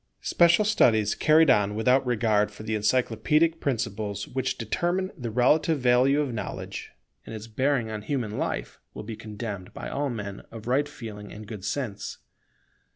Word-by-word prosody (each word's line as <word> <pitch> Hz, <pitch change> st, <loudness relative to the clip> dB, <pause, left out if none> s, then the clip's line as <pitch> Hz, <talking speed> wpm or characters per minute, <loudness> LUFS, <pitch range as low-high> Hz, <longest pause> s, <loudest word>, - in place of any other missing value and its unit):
Special 170 Hz, +4 st, +4 dB
studies 110 Hz, -, +3 dB
carried 160 Hz, +1 st, +5 dB
on 105 Hz, 0 st, +2 dB
without 125 Hz, +5 st, +3 dB
regard 110 Hz, -3 st, +2 dB
for 105 Hz, +1 st, -11 dB
the 110 Hz, 0 st, -3 dB
encyclopædic 130 Hz, +9 st, +2 dB
principles 110 Hz, -6 st, -2 dB
which 130 Hz, 0 st, -2 dB
determine 175 Hz, -, -1 dB
the 125 Hz, -8 st, -5 dB
relative 140 Hz, +7 st, +3 dB
value 130 Hz, +3 st, +4 dB
of 140 Hz, -5 st, -2 dB
knowledge, 105 Hz, -4 st, -5 dB, 0.3 s
and 115 Hz, -, -8 dB
its 110 Hz, 0 st, -7 dB
bearing 120 Hz, 0 st, 0 dB
on 105 Hz, -1 st, -4 dB
human 115 Hz, -3 st, -2 dB
life, -, -, -3 dB, 0.2 s
will -, -, -6 dB
be 110 Hz, +1 st, -6 dB
condemned 105 Hz, -3 st, -6 dB
by -, -, -6 dB
all 140 Hz, 0 st, -1 dB
men 105 Hz, -5 st, -5 dB
of 110 Hz, -1 st, -10 dB
right 140 Hz, +4 st, +1 dB
feeling 105 Hz, -6 st, -9 dB
and 105 Hz, +1 st, -9 dB
good 105 Hz, -2 st, -8 dB
sense. 115 Hz, -3 st, -4 dB
115 Hz, 160 wpm, -26 LUFS, 105-140 Hz, 0.3 s, carried